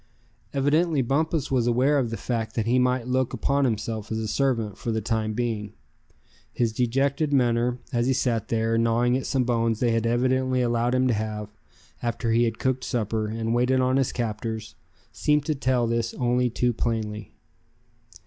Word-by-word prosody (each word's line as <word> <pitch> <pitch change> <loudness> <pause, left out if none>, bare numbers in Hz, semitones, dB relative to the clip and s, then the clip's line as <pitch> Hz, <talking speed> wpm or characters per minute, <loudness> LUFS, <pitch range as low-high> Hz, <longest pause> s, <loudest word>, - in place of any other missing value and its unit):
Evidently 145 +2 +2
Bumpus 150 +3 0
was 125 -3 +2
aware 130 +5 +3
of 120 -4 -1
the 115 - -4
fact 115 +1 -3
that 115 - 0
he 125 +2 +3
might 125 -1 +1
look 130 0 0
upon 140 0 +1
himself 110 -2 -2
as 110 - -1
a 110 -1 -2
servant, 115 -4 0
for 115 - -4
the 110 - 0
time 110 0 -1
being. 110 -3 -3 0.8
His 115 -2 0
dejected 135 +5 0
manner, 120 -2 +2 0.2
as 120 0 +1
he 130 - +3
sat 120 -4 0
there, 115 0 +1
gnawing 115 +2 +2
at 130 - -2
some 130 -2 +1
bones 115 -2 0
they 120 -2 +2
had 115 0 +1
evidently 130 +1 +1
allowed 120 +1 +1
him 130 0 +2
to 125 - +2
have, 105 -1 -3 0.5
after 115 -1 -1
he 120 +1 +3
had 115 -1 -2
cooked 130 -1 -1
supper, 110 -2 -1
and 115 +1 -2
waited 125 +2 +2
on 130 +1 +2
his 135 -2 +1
captors, 110 -1 -4 0.4
seemed 150 -1 +1
to 155 - +1
tell 130 -3 +1
this 115 0 -1
only 125 0 +1
too 120 +1 0
plainly. 105 -3 -3
120 Hz, 180 wpm, -25 LUFS, 115-130 Hz, 0.8 s, aware